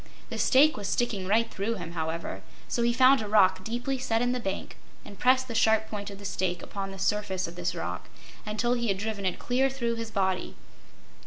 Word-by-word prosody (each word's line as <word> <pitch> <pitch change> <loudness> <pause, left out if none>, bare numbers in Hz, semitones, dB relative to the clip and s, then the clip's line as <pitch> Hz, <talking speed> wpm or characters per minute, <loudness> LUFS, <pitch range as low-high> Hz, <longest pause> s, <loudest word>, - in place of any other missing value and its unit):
The - - -4
stake 285 +2 +5
was 205 -1 -4
sticking 205 -6 -1
right 225 +3 +3
through 210 +4 -2
him, 170 -4 -6
however, 160 - -4 0.3
so 240 - -1
he 235 0 +3
found 260 +2 +5
a 215 - -4
rock 190 -3 +4
deeply 245 +5 -2
set 225 -3 0
in 245 +1 +1
the 250 - -1
bank 195 -4 -4 0.3
and 200 - -11
pressed 255 +1 +4
the 235 - -5
sharp 220 -1 +3
point 205 -1 -4
of 200 - -9
the 200 - -11
stake 185 -2 -2
upon 195 -1 -5
the 195 - -8
surface 190 -2 -1
of 170 - -9
this 175 0 -2
rock - - -5 0.3
until 220 +3 0
he 235 -1 -1
had 195 -2 +1
driven 205 -1 -3
it 185 - -1
clear 260 +2 +1
through 235 -3 -2
his 230 -1 -4
body. 190 -3 -1
215 Hz, 220 wpm, -28 LUFS, 190-240 Hz, 0.3 s, stake